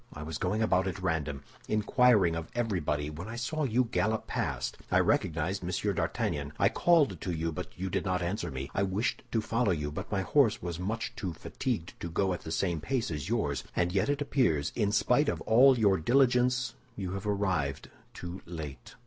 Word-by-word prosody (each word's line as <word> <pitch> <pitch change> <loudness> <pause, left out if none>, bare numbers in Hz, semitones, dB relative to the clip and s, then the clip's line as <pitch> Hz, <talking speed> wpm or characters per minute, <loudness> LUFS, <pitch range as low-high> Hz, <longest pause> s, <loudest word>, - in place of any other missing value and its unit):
I 75 - -7
was 80 +1 -5
going 105 +5 0
about 95 -3 +2
at 95 - -3
random, 75 -6 -2 0.2
inquiring 105 -4 +4
of 85 -1 -5
everybody, 80 -11 -1
when 85 +6 -7
I 110 - -6
saw 145 +6 -1
you 125 0 +2
gallop 110 -1 0
past. - - -3
I - - +4
recognized 85 +5 +1
Monsieur 95 +3 -1
d'Artagnan. 75 -4 -2
I - - +4
called 165 -5 +3
to 90 - -2
you, 80 0 -1
but 75 - -5
you 95 - -3
did - - 0
not 90 -1 0
answer 95 +5 -2
me; 65 +1 -5
I - - 0
wished 100 +4 0
to 115 - +1
follow 115 +1 0
you, 75 -5 -1
but 75 - -6
my 100 -2 +1
horse 120 +2 +3
was 85 -2 -4
too 90 - -5
much 115 +3 -2 0.2
fatigued 105 -1 -3
to 85 - -4
go 95 +3 +1
at 90 - -5
the 80 - -7
same 85 -3 0
pace 125 - -1
with 75 +4 -4
yours. 105 - 0
And 90 0 +1
yet 95 +7 +1
it 145 0 +1
appears, 80 - +1
in 105 -3 +1
spite 125 +7 +3
of - - -2
all 130 +4 +6
your 100 -4 +4
diligence, 125 - +3 0.2
you 95 -3 -4
have 100 +2 -4
arrived 95 -9 -1 0.2
too 90 +1 -7
late." 80 - -8
95 Hz, 200 wpm, -30 LUFS, 80-115 Hz, 0.2 s, all